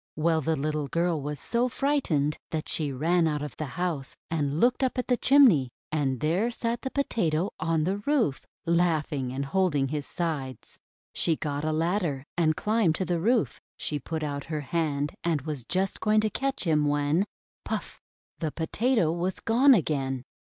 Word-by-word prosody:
Well, 160 +1 +2
the 160 +3 +1
little 150 0 -2
girl 170 +1 0
was 145 0 -4
so 240 - 0
frightened 205 - 0
that 155 -1 -3
she 150 -3 -2
ran 165 +5 +2
out 150 -2 -1
of 150 -4 -6
the 155 - -3
house, 170 -7 -2 0.2
and 150 -2 0
looked 250 +4 +3
up 260 0 0
at 250 - 0
the 250 - +2
chimney. 240 - +5 0.2
And 135 -5 0
there 175 +10 +1
sat 235 0 -2
the 265 - -3
Potato 190 - 0
on 160 0 +1
the 190 +5 0
roof, 230 - +1 0.2
laughing 160 -6 +1
and 135 +2 -3
holding 145 -4 +1
his 145 -1 -3
sides. 150 -7 -4 0.3
She 165 - +1
got 145 -1 -3
a 155 - 0
ladder 160 -3 0
and 160 -2 +2
climbed 210 -6 +2
to 185 - -1
the 175 0 0
roof. 225 +5 +1 0.2
She 150 - -2
put 160 +3 -4
out 140 -1 -3
her 155 -2 -3
hand 145 0 -1
and 165 -4 +1
was 150 -5 -4
just 190 +8 -1
going 215 0 +3
to 215 0 0
catch 275 +5 -1
him, 155 -4 +2
when 145 +6 +1 0.2
— - - -78
puff! - - -5 0.4
the 160 -3 -2
Potato 190 - +1
was 175 +2 -2
gone 255 +4 +5
again! 135 - -1
160 Hz, 180 wpm, -27 LUFS, 145-195 Hz, 0.4 s, chimney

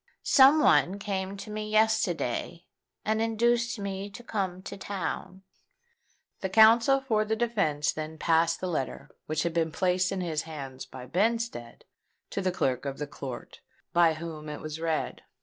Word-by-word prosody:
Some 275 +2 +7
one 190 - +4
came 195 -1 -3
to 210 +2 -8
me 215 0 -4
yesterday, 180 - +1 0.4
and 220 +1 +1
induced 235 +2 +1
me 200 0 -4
to 205 +4 -11
come 190 -5 -3
to 200 - -7
town." 190 -1 -5 1.0
The 190 - -3
counsel 230 +6 +6
for 220 -5 +1
the 220 +1 -1
defence 200 -11 +1
then 155 0 -6
passed 165 +1 +2
the 185 - -2
letter, 155 -7 -3 0.2
which 155 0 0
had 170 -1 -1
been 165 -1 0
placed 185 +2 +1
in 195 -1 -2
his 160 -4 -1
hands 135 -5 -8
by 130 -1 -9
Benstead, 210 - -1 0.5
to - - -2
the 185 -1 +1
clerk 135 -7 -1
of 135 -1 -4
the 150 - -3
court, 135 -3 -8 0.3
by 170 -2 +4
whom 155 -2 -7
it 150 - -6
was 155 0 -6
read. 165 -1 -2
185 Hz, 165 wpm, -28 LUFS, 155-215 Hz, 1.0 s, Some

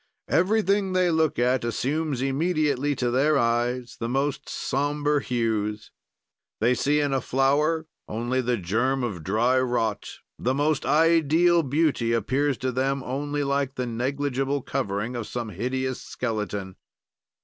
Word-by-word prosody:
"Everything 195 +2 +2
they 180 -1 +3
look 160 -2 +1
at 125 +1 +2
assumes 135 +3 -1
immediately 145 -1 +1
to 125 -2 -1
their 140 +4 +3
eyes 120 +1 0
the 115 - -2
most 135 +2 -1
somber 145 +2 0
hues. 110 -4 -2 0.7
"They 120 +3 +3
see 145 +4 +1
in 145 -2 0
a 135 - +1
flower 150 +5 +1 0.2
only 120 +4 -1
the 125 -1 0
germ 120 +8 0
of 95 -9 -4
dry 115 +8 +2
rot; 120 -4 -1 0.3
the 130 +2 0
most 145 +1 0
ideal 165 +2 +4
beauty 140 -5 +1
appears 135 +4 +1
to 130 -1 -2
them 135 +2 -1
only 145 +3 -2
like 140 -1 -1
the 125 - -2
negligible 135 +3 -1
covering 100 +5 -2
of 115 -3 -4
some 120 -2 -4
hideous 130 +6 -3
skeleton. 105 -5 -4
130 Hz, 140 wpm, -25 LUFS, 120-145 Hz, 0.7 s, ideal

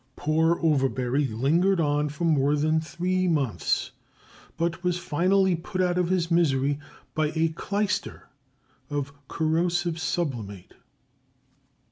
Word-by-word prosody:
Poor 160 +2 +1
Overbury 135 -2 +1
lingered 160 - +2
on 150 -1 +1
for 150 +4 -6
more 150 -3 +3
than 155 +2 +1
three 180 +3 -1
months, 135 - 0 0.7
but 170 +2 -2
was 180 -1 +1
finally 185 +3 +2
put 170 +3 -6
out 180 -1 +2
of 175 -1 +1
his 180 -2 0
misery 145 -4 +2 0.3
by 155 -1 0
a 160 0 +2
clyster 205 +5 -3 0.6
of 140 -1 -3
corrosive 170 +1 0
sublimate. 120 - -3
160 Hz, 115 wpm, -26 LUFS, 145-175 Hz, 0.7 s, more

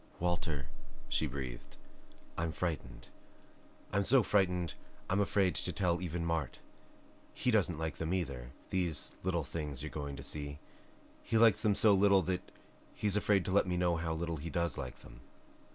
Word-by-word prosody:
"Walter," 85 -5 -1 0.4
she 80 - +2
breathed, 65 -3 -6 0.6
"I'm 80 0 -1
frightened. 80 -8 -4 0.9
I'm 100 +1 +3
so 125 +4 +5
frightened 90 -4 +2 0.4
I'm 100 - +3
afraid 100 -2 +2
to 90 - -1
tell 90 -2 0
even 85 -1 -2
Mart. 80 -5 -1 0.8
He 125 - +1
doesn't 95 -7 +2
like 80 -3 -3
them, 80 0 -2
either, 70 -10 -2 0.2
these 85 -6 +1
little 85 -3 0
things 75 -2 -4
you're 75 - -5
going 70 -2 -4
to - - -8
see. 70 -1 -3 0.6
He 115 - 0
likes 110 -2 +6
them 105 -2 +3
so 105 0 +6
little 100 -1 +5
that 90 +1 -1 0.5
he's 105 -2 0
afraid 105 -3 +3
to - - -2
let 100 0 +4
me 90 -1 0
know 90 -1 +2
how 80 -1 -2
little 85 0 -2
he 80 +3 -5
does 85 -2 0
like - - -6
them." - - -14
85 Hz, 170 wpm, -33 LUFS, 80-95 Hz, 0.9 s, likes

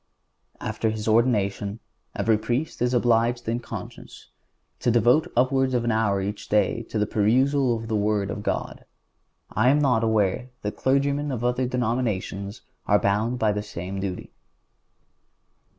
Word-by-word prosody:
And - - -5
after 110 +1 -1
his 110 0 -4
ordination 110 -2 +1 0.4
every 110 +2 +2
Priest 125 +7 -2
is 125 +1 +2
obliged 120 0 +2
in 115 +1 0
conscience - - -9 0.5
to - - 0
devote 120 +9 +3
upwards 130 +1 +2
of 120 - +1
an 120 - +1
hour 105 -3 +1
each 100 +2 -5
day 105 +2 +2
to - - -3
the 105 - +2
perusal 125 +4 +2
of 110 0 -7
the 110 - -1
Word 105 -1 0
of 105 - -5
God. - - -3 0.7
I 110 +5 +3
am 140 - +4
not 125 -6 +2
aware 110 +2 +1
that 105 - -3
clergymen 140 +2 +1
of 120 -3 -3
other 125 +1 +1
denominations 110 -5 -2 0.3
are 105 - +5
bound 105 +5 0
by 110 -3 +2
the 105 0 -2
same 95 -2 -6
duty. 95 -2 -5
115 Hz, 155 wpm, -25 LUFS, 105-125 Hz, 0.7 s, are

